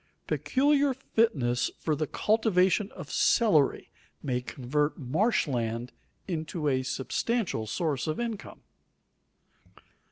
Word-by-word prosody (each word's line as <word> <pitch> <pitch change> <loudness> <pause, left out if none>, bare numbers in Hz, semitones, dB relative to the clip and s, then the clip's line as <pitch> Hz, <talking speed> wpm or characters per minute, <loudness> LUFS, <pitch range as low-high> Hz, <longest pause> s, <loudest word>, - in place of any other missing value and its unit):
Peculiar 280 0 +2
fitness 150 - +1
for 155 - -1
the 155 +1 -2
cultivation 205 - +2
of 175 -6 -9
celery 180 - +3 0.3
may 125 -2 -1
convert 145 +4 -1
marsh 160 - +1
land 120 -2 -2 0.4
into 160 -3 -3
a 130 -2 +2
substantial 135 - -2
source 150 - -1
of 155 - -2
income. 230 -3 -5
155 Hz, 100 wpm, -28 LUFS, 130-220 Hz, 0.4 s, celery